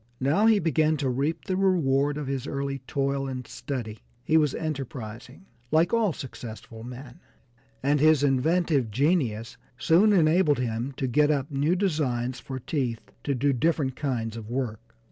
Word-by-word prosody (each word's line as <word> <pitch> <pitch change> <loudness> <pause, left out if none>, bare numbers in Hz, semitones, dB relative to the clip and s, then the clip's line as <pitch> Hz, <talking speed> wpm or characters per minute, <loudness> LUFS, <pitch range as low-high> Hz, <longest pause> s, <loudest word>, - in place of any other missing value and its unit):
Now 155 +12 +3
he 225 -2 +6
began 155 -3 +2
to 135 -2 -1
reap 140 +6 -2
the 185 - -1
reward 145 -7 +2
of 150 - -4
his 135 0 -3
early 140 0 -3
toil 140 0 -1
and 130 -2 -5
study. 115 -6 -5 0.2
He 155 - +1
was 150 -3 +3
enterprising, 130 - -6 0.2
like 160 - +3
all 225 -4 +3
successful 115 -5 -9
men, 125 +1 -10 0.6
and 145 +2 +2
his 155 -1 +5
inventive 145 -1 +2
genius 125 - 0 0.2
soon 180 - +4
enabled 160 -4 +4
him 120 +1 -2
to 130 - -3
get 145 +4 +3
up 145 0 0
new 145 +5 +1
designs 130 -10 -1
for 130 - -6
teeth 125 -3 -3
to 140 - 0
do 140 +3 +2
different 140 -1 0
kinds 120 -6 -2
of 110 -1 -8
work. 120 -4 -2
140 Hz, 160 wpm, -26 LUFS, 125-155 Hz, 0.6 s, he